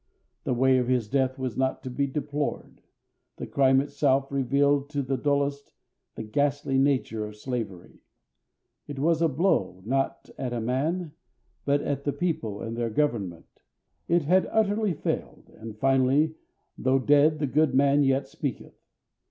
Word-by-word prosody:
The 125 - 0
way 130 +1 +4
of 125 - -1
his 125 -4 +1
death 130 +2 0
was 130 -3 -3
not 130 0 -1
to 130 - -5
be 140 +2 0
deplored; 145 +1 -4 0.6
the - - -5
crime 135 -1 +3
itself 140 -1 0
revealed 140 +1 +1
to 145 -2 -2
the 135 +1 -1
dullest 140 +1 -1 0.4
the - - -5
ghastly 140 +4 0
nature 135 -5 +1
of 105 0 -7
slavery; 105 -5 -6 0.9
it 145 - -7
was 160 +3 +1
a 165 - +4
blow 130 - 0
not 135 +3 -1
at 125 -2 -3
a 120 - -2
man, 150 +9 -1 0.5
but 145 0 +2
at 140 0 -2
the 145 - -1
people 115 - -3
and 115 0 -4
their 120 -1 -1
government; 105 - -2 0.5
it 170 -1 +2
had 185 +6 +2
utterly 215 -3 +1
failed; - - -4
and, 110 -1 -9
finally, 135 +5 +3 0.5
though 130 +1 +2
dead 145 +3 +4
the 150 - -1
good 145 0 +2
man 140 +1 +4
yet 135 0 +1
speaketh. 135 -2 -6
135 Hz, 155 wpm, -26 LUFS, 125-145 Hz, 0.9 s, way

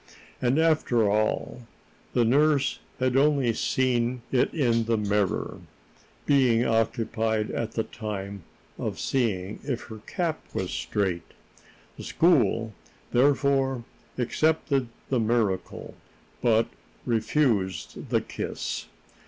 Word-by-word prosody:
And, 125 +3 +2
after 155 -9 +3
all, 110 +3 -1 0.5
the 120 - +3
nurse 140 +2 +3 0.2
had 130 0 +1
only 140 -4 +3
seen 125 0 0
it 125 - +2
in 120 -7 +1
the 115 0 +1
mirror, 105 -2 -1 0.6
being 125 -4 +4
occupied 115 -1 0
at 115 -1 -3
the 110 - 0
time 100 -3 -6 0.4
in - - -2
seeing 105 -7 -1
if 130 -4 -3
her 110 -1 -8
cap 165 -3 -2
was - - -2
straight. 95 -4 -2 0.6
The - - -8
school, 115 - +2 0.4
therefore, 135 -1 +2 0.3
accepted 140 +1 +1 0.2
the 130 - +2
miracle, 110 -4 -1 0.5
but 115 -2 +3 0.4
refused 110 - 0
the - - +2
kiss. - - -4
120 Hz, 105 wpm, -26 LUFS, 110-135 Hz, 0.6 s, being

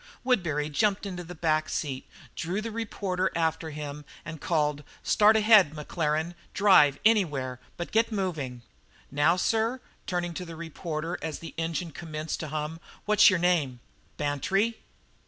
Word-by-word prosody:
Woodbury 170 - +1
jumped 195 +7 +1
into 180 -3 -5
the 175 +1 -9
back 155 -1 +1
seat, 135 -3 -3 0.3
drew 180 +5 -2
the 225 +1 -4
reporter 195 -4 -2
after 160 -1 0
him, 150 -1 -6 0.2
and 160 -2 -7
called: 150 -3 0 0.2
"Start 215 +1 +5
ahead, 210 -8 +6
Maclaren 155 +2 -1 0.2
drive 150 -9 +6
anywhere, 145 - +2 0.2
but 175 - -5
get 230 +1 +2
moving." 155 - -3 0.5
"Now, 145 +4 +3
sir," 225 +6 +1 0.3
turning 175 -2 -2
to 180 - -5
the 165 -2 -8
reporter 165 0 -4
as 160 0 -3
the 165 - -9
engine 165 +1 -2
commenced 155 0 -5
to 155 - -4
hum, 155 +2 -4 0.3
"what's 210 -1 +7
your 185 - +2
name?" 165 -8 +1 0.4
"Bantry." 195 - 0
165 Hz, 145 wpm, -28 LUFS, 150-195 Hz, 0.5 s, what's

